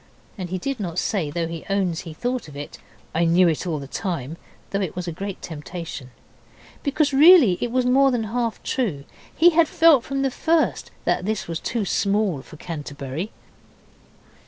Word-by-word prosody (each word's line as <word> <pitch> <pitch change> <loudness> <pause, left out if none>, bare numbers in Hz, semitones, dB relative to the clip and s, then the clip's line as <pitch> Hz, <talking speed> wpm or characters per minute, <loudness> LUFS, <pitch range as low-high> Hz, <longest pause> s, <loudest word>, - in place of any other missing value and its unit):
And 185 -4 -6
he 185 - -2
did 275 +6 -3
not 175 -4 -4
say, 180 -8 0
though 165 +3 -2
he 165 -1 -6
owns 190 -4 0
he 165 - -8
thought 245 +3 -2
of 145 - -12
it 145 - -8 0.3
'I 170 +1 +2
knew 175 +2 +5
it 165 +2 -1
all 160 -3 -1
the 140 - -6
time,' 160 - -4 0.4
though 200 - 0
it 185 -5 -3
was 180 0 -4
a - - -2
great 195 +3 -5
temptation. 160 -4 -7 0.7
Because 285 0 +1
really 285 - +7
it 240 - 0
was 255 +1 +1
more 270 +2 +5
than 245 -3 0
half 230 +1 -2
true. 190 - -1 0.3
He 345 +2 +6
had 330 -1 +4
felt 315 -7 +5
from 275 0 -2
the 270 - +1
first 320 +4 +1 0.2
that - - +1
this 215 0 -2
was 165 -1 -3
too 230 +2 -2
small 200 -6 +1
for 150 - -14
Canterbury. 150 +2 -5
190 Hz, 185 wpm, -23 LUFS, 165-250 Hz, 0.7 s, really